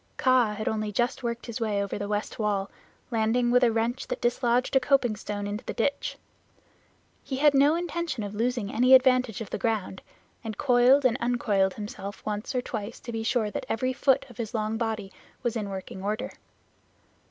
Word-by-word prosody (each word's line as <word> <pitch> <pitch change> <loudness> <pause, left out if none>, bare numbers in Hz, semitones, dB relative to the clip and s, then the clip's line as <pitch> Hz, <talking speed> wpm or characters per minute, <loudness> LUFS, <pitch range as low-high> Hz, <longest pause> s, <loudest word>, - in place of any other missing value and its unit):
Kaa 255 -5 +3
had 215 +1 -4
only 215 -1 -1
just 240 +6 0
worked 235 -1 -3
his 235 -1 -6
way 210 -3 0
over 200 +1 -4
the 205 - -3
west 210 +2 -3
wall, 205 -2 0 0.4
landing 235 +2 +2
with 250 +1 +5
a 235 - +5
wrench 230 +3 -1
that - - -3
dislodged 245 +1 +1
a - - +7
coping 260 -4 +2
stone 205 -1 -5
into 205 +4 -4
the - - -5
ditch. 280 +5 -1 1.1
He 265 - -4
had 295 +1 +5
no 285 +3 +5
intention 340 -7 -3
of 205 0 -5
losing 235 -1 -1
any 250 +3 +7
advantage 255 -4 +3
of 220 - -7
the - - -3
ground, 215 -4 -1 0.4
and 220 -2 -5
coiled 255 +1 +4
and 245 -1 +3
uncoiled 210 -6 +1
himself 205 -2 -7
once 210 +4 -3
or 250 - 0
twice, 220 -1 -5
to 235 - -7
be 225 -1 -3
sure 225 -2 0
that - - -5
every 255 +3 0
foot 270 +1 +2
of 240 - -15
his 230 -1 -4
long 215 0 -1
body 220 -3 -3 0.3
was 240 -2 -1
in 210 -3 -3
working 190 -1 -7
order. 210 +3 -2
230 Hz, 195 wpm, -27 LUFS, 210-255 Hz, 1.1 s, a